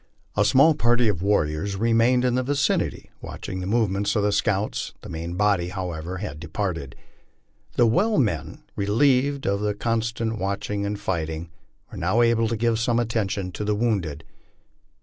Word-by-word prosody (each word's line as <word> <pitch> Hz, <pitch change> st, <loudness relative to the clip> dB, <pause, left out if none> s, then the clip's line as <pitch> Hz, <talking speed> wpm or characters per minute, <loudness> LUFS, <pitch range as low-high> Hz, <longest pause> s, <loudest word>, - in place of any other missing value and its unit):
A -, -, +3 dB
small 140 Hz, +5 st, +5 dB
party 120 Hz, -4 st, +2 dB
of 90 Hz, -5 st, -2 dB
warriors 95 Hz, -1 st, 0 dB
remained 115 Hz, +4 st, +3 dB
in 125 Hz, -, +2 dB
the 130 Hz, -, +2 dB
vicinity 140 Hz, +2 st, -1 dB
watching 95 Hz, -, -6 dB
the 90 Hz, -, -4 dB
movements 100 Hz, -2 st, +1 dB
of 105 Hz, -, +2 dB
the 105 Hz, -, +2 dB
scouts; 105 Hz, 0 st, -1 dB
the -, -, -10 dB
main 85 Hz, +2 st, -5 dB
body, 100 Hz, -3 st, +2 dB
however, 90 Hz, -2 st, -4 dB
had 90 Hz, -6 st, -6 dB
departed. 85 Hz, -4 st, -4 dB, 0.8 s
The 120 Hz, -, +5 dB
well 200 Hz, -, +2 dB
men, 105 Hz, -, -1 dB
relieved 130 Hz, +7 st, +2 dB
of 100 Hz, 0 st, +1 dB
the 105 Hz, 0 st, -1 dB
constant 115 Hz, 0 st, -1 dB
watching 100 Hz, +1 st, -2 dB
and 100 Hz, 0 st, -3 dB
fighting, 80 Hz, -1 st, -3 dB, 0.4 s
were -, -, -7 dB
now 95 Hz, +8 st, +2 dB
able 115 Hz, -1 st, +3 dB
to 115 Hz, +1 st, -2 dB
give 115 Hz, 0 st, +1 dB
some 115 Hz, 0 st, +1 dB
attention 105 Hz, -5 st, -1 dB
to 105 Hz, -, -5 dB
the 105 Hz, 0 st, 0 dB
wounded. 100 Hz, -10 st, -1 dB
105 Hz, 165 wpm, -24 LUFS, 95-115 Hz, 0.8 s, small